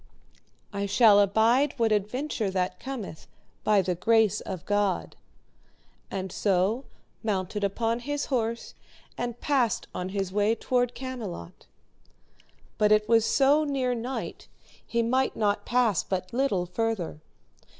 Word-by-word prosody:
I 200 0 -2
shall 205 0 +6
abide 225 +8 +3
what 230 -2 +2
adventure 215 +2 -1
that 185 -1 -2
cometh 245 -12 -7 0.4
by 210 -2 +4
the 180 0 0
grace 220 +3 +2
of 185 -2 -6
God, 205 -2 0 0.9
and 190 -1 -4
so 200 +7 +1 0.4
mounted 205 -1 -2
upon 225 +4 0
his 290 +3 -3
horse, 230 -1 -1 0.4
and 240 -1 -4
passed 260 -6 +1
on 180 +1 -4
his 195 -1 -3
way 210 +2 +2
toward 245 0 0
Camelot; 235 - -7 1.1
but 210 -1 +4
it 215 0 +4
was 225 -1 +4
so 285 +3 +4
near 270 -4 0
night 245 +3 -5 0.4
he 235 0 0
might 260 +3 +1
not 205 -1 0
pass 235 -6 +2
but 185 0 -4
little 240 -9 +1
further. 195 -4 -2
220 Hz, 130 wpm, -27 LUFS, 195-245 Hz, 1.1 s, shall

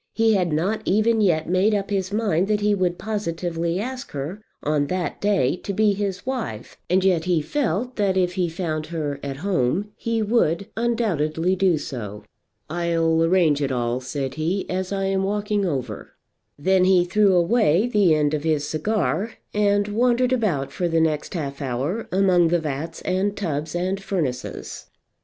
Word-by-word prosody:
He 225 -1 +3
had 180 -4 +1
not 190 +8 0
even 220 +3 +3
yet 165 -6 +2
made 190 +5 +3
up 200 0 -2
his 190 -1 -1
mind 200 -4 +1
that 210 0 +1
he 210 0 +3
would 180 -3 0
positively 170 -4 -2
ask 255 +4 -5
her 150 +9 -5 0.2
on 145 -1 +1
that 180 +1 -3
day 195 -10 +2
to 200 - -5
be 210 +1 +3
his 195 -1 -3
wife, 240 - -4
and 185 +2 +3
yet 175 -4 +2
he 180 -3 +2
felt 240 - -2
that 195 -3 +1
if 180 -1 +1
he 180 -2 0
found 160 -2 -3
her 150 -4 -3
at 135 -1 -5
home 190 +3 0
he 230 -1 -1
would 200 -5 +1
undoubtedly 185 -8 0
do 185 -3 +3
so. 105 -8 -6 0.4
"I'll 165 -1 +1
arrange 165 -4 +3
it 140 -1 0
all," 120 -1 -1
said 135 +1 -4
he, 165 +6 -2
"as 185 +1 -2
I'm 195 -1 0
walking 205 0 0
over." 125 - -4 0.4
Then 185 +4 +3
he 185 -2 +4
threw 195 +1 +3
away 180 +1 +3
the 205 -9 +4
end 150 -1 +1
of 150 -1 -1
his 155 -3 +1
cigar, 205 +5 -1 0.2
and 205 -1 +2
wandered 245 +4 +2
about 185 - 0
for 175 - -1
the 165 -1 +1
next 160 +2 0
half 140 -4 -4
hour 140 - -2
among 185 -2 +4
the 175 +1 +2
vats 155 0 -5
and 190 +3 0
tubs 155 -4 -3
and 185 +3 -1
furnaces. 150 -11 -4
180 Hz, 170 wpm, -23 LUFS, 155-205 Hz, 0.4 s, he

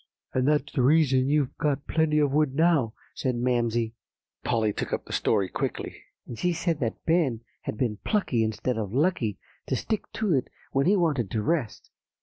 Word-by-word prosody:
"'And 130 +1 +1
that's 145 -1 +1
the 130 - +1
reason 135 -1 +4
you've 145 -3 +1
got 145 -1 0
plenty 160 -1 +1
of 145 -2 +3
wood 145 -2 +2
now,' 155 -8 +3 0.2
said 130 -2 -1
Mamsie." 120 -2 0 0.5
Polly 110 -2 +1
took - - -4
up - - -2
the - - -8
story 100 -4 +2
quickly. - - -3 0.3
"And 115 - -8
she 180 0 +1
said 165 -2 -1
that 115 -4 -3
Ben 155 -9 +2 0.2
had - - -3
been 115 -4 0
plucky, 125 - 0
instead 110 +2 -1
of 105 +1 -4
lucky, 135 - +1 0.3
to - - 0
stick 220 - -3
to 215 -5 0
it 130 -3 +1 0.2
when 135 +3 +2
he 200 - +5
wanted 145 - +1
to 110 +1 -1
rest. 145 -6 -2
135 Hz, 185 wpm, -27 LUFS, 115-155 Hz, 0.5 s, he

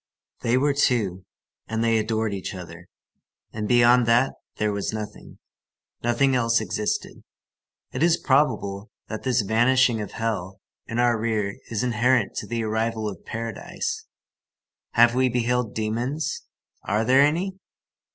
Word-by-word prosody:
They 120 +2 +2
were 140 +2 +2
two, 110 -10 +1 0.4
and 115 0 -1
they 115 -1 +3
adored 110 -1 -1
each 95 0 -5
other, 85 -1 -10 0.7
and 105 -1 -3
beyond 120 0 +5
that 120 +3 +3 0.2
there 105 0 0
was 100 -1 -2
nothing. 110 -1 -7 0.6
Nothing 120 +3 +2
else 115 -1 +3
existed. 105 0 -3 0.7
It 130 - -4
is 170 0 +4
probable 115 - +1 0.2
that 110 - -4
this 130 -2 +1
vanishing 120 +2 +3
of 105 - -7
hell 100 -5 -3 0.3
in 115 - -4
our 120 -2 +3
rear 110 -3 -1 0.2
is 115 0 -2
inherent 120 -1 +2
to 105 - -4
the 115 0 -2
arrival 110 0 -1
of 100 - -7
paradise. 115 -1 -4 0.9
Have 120 0 +6
we 130 +1 +2
beheld 120 -1 0
demons? 120 +8 -2 0.4
Are 105 +2 0
there 130 +3 +5
any? 180 +6 +1
115 Hz, 140 wpm, -24 LUFS, 110-125 Hz, 0.9 s, Have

